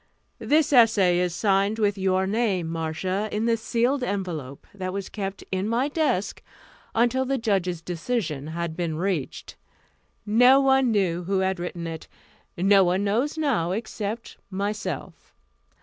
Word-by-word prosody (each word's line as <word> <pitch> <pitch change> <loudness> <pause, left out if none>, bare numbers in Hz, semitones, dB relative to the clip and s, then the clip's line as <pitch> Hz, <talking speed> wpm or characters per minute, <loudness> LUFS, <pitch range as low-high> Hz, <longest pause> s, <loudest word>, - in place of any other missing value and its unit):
"This 300 -1 +2
essay 210 -8 +5
is 180 -1 0
signed 200 +2 +1
with 205 -2 +1
your 190 -1 +1
name, 200 -4 0
Marcia, 165 +5 -2
in 215 +2 -1
the 230 -1 +3
sealed 240 +4 0
envelope 175 - -4
that 185 -2 -5
was 200 -1 -4
kept 195 -2 -5
in 190 +2 -1
my 245 +5 +1
desk 290 - -1 0.5
until 240 +3 +2
the 270 +1 -1
judges' 190 -7 -1
decision 170 - -3
had 165 0 -4
been 165 -3 -2
reached. 175 -5 -3 0.7
No 245 +5 +6
one 265 -2 +3
knew 180 -5 0
who 190 +1 0
had 190 -1 0
written 175 -1 -5
it. 165 -1 -6 0.5
No 195 +2 +5
one 185 +2 +1
knows 240 +10 0
now, 235 - 0
except 220 +1 -5
myself. 195 -4 -5
195 Hz, 145 wpm, -25 LUFS, 180-230 Hz, 0.7 s, No